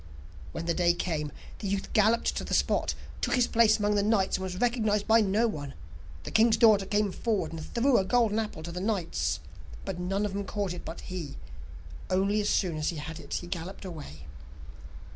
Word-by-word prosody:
When 165 - -5
the 170 - +1
day 175 0 +3
came, 155 -4 -2 0.3
the 205 - -4
youth 195 0 -2
galloped 220 +2 +3
to - - -2
the - - -1
spot, - - +1 0.3
took - - +1
his 250 -2 +4
place 225 -2 +4
amongst 210 -1 +1
the - - +3
knights, 200 -2 +2
and 190 - -5
was 185 -1 -4
recognized 220 -4 +1
by 225 +1 +6
no 210 +3 +2
one. 145 -9 -5 0.5
The - - -6
king's 220 0 +5
daughter 215 -4 +5
came 205 -1 +1
forward, 215 -3 -1
and 160 -1 -6
threw 240 - +2
a - - +1
golden 225 +1 +2
apple 210 -7 -4
to 170 - -6
the 180 +1 -4
knights, 195 -5 -1 0.4
but 190 -3 -4
none 195 +3 -1
of 205 - -3
them 200 0 -2
caught 200 -2 -2
it 175 - -8
but 165 - -6
he, 170 -6 -6 0.7
only 195 +3 +2
as 205 - 0
soon 175 -5 +1
as 155 - 0
he 170 - -3
had 155 +2 -6
it - - -5
he - - -3
galloped 175 +3 -6
away. 145 - -8
195 Hz, 210 wpm, -29 LUFS, 175-215 Hz, 0.7 s, by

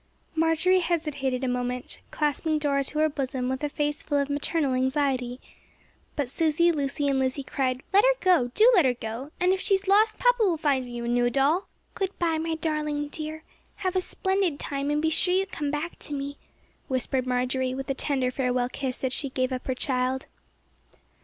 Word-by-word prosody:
Marjory 325 +3 +3
hesitated 300 -7 -1
a - - +1
moment, 250 0 -3
clasping 305 +1 0
Dora 280 -2 +1
to 300 - -5
her 310 0 +4
bosom 265 -3 -2
with 265 +2 -3
a 295 - 0
face 295 0 -2
full 290 - -1
of 280 0 0
maternal 290 -1 0
anxiety. 260 -1 0 0.8
But 285 -3 -1
Susy, 320 +5 +2
Lucy 285 -2 -1
and 275 -1 +2
Lizzie 265 +1 0
cried: 260 -1 -1
"Let 405 +2 +6
her - - +5
go, 355 -10 +4
do 455 +3 +7
let 365 -7 +6
her 250 -1 +2
go, 235 +4 -6
and 360 +1 +3
if 380 - -1
she 390 - +3
is 385 0 -4
lost 430 +3 +4
papa - - +3
will 360 -5 +2
give 275 -4 +1
you 240 -1 -5
a - - -3
new 240 0 +2
doll." 280 +9 +2 0.3
"Good 385 0 -3
by, 330 -3 +1
my 325 0 -1
darling 300 -2 -2
dear. 310 +1 -5 0.3
Have 375 -1 -2
a 370 - +3
splendid 380 -5 0
time, 280 0 -2
and 295 +1 0
be 320 - +2
sure 360 +3 +2
you 385 +1 +2
come 300 -6 -4
back 300 +4 -4
to 295 - -7
me," 280 +1 -5 0.5
whispered 260 -1 -1
Marjory, 255 +1 0
with 270 0 -5
a 275 - 0
tender 265 -2 0
farewell 250 -1 0
kiss 265 -1 -4
as 260 -1 0
she 280 0 +1
gave 255 0 -1
up 255 -1 -4
her 260 - 0
child. 255 0 -1
285 Hz, 200 wpm, -26 LUFS, 260-325 Hz, 0.8 s, do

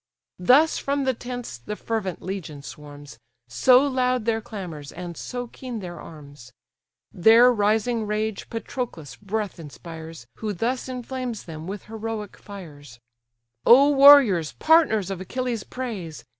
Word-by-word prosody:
Thus 270 - +4
from 280 0 -1
the 260 -1 +1
tents 245 - -7
the 210 - -6
fervent 210 -5 -4
legion 170 -7 -6
swarms, 145 -5 -11 0.3
So 250 - +5
loud 255 -3 0
their 225 -1 0
clamours, 175 -10 -8
and 175 -1 -7
so 245 +6 -5
keen 245 0 -8
their 175 -3 -8
arms: 145 -5 -13 0.6
Their 230 +7 +6
rising 220 +1 +1
rage 215 0 -3
Patroclus' 225 - -6
breath 205 -1 -4
inspires, 160 -2 -10
Who 215 -2 -3
thus 245 +7 -2
inflames 250 -2 -5
them 160 -1 -9
with 200 0 -6
heroic 220 -1 -6
fires: 145 - -12 0.6
"O 275 +4 +7
warriors, 270 - +7
partners 275 - +3
of 190 -1 -5
Achilles' 240 +2 -3
praise! 190 - -6
210 Hz, 130 wpm, -24 LUFS, 165-250 Hz, 0.6 s, O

